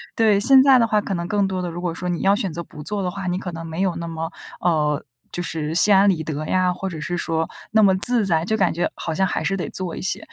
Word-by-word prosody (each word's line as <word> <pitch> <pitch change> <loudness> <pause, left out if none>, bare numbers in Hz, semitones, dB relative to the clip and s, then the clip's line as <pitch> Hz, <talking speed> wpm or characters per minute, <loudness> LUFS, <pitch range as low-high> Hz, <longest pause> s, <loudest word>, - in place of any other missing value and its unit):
对， 215 -3 +3
现 265 +5 +6
在 265 -2 +6
的 230 - +2
话 215 -1 +2
可 200 - -4
能 170 -1 -3
更 200 0 0
多 185 -1 -3
的 180 - -4
如 170 +1 -7
果 175 -2 -2
说 180 +2 -5
你 175 - -3
要 195 +1 +3
选 205 -4 -2
择 170 +2 -6
不 150 - -12
做 200 +5 -3
的 180 - -2
话， 195 0 -6
你 180 0 -1
可 185 -2 -6
能 165 0 -8
没 160 +3 -5
有 185 -3 0
那 170 0 -5
么， 165 +1 -5 0.3
呃， 150 -4 0 0.3
就 175 - -3
是 160 -2 -4
心 205 +3 +7
安 195 +1 +5
理 170 -5 0
得 155 0 -5
呀， 185 +1 +1
或 190 +2 -5
者 165 -4 -7
是 175 +3 -3
说 165 -1 -2 0.2
那 220 0 +4
么 190 -2 +4
自 235 +2 +6
在， 165 -3 +1
就 220 +3 0
感 190 -4 +1
觉 175 - -1
好 165 - -4
像 190 +4 +1
还 - - -3
是 195 - -1
得 180 - -4
做 185 -3 -3
一 - - -7
些。 190 - 0
180 Hz, 320 characters per minute, -21 LUFS, 165-200 Hz, 0.3 s, 心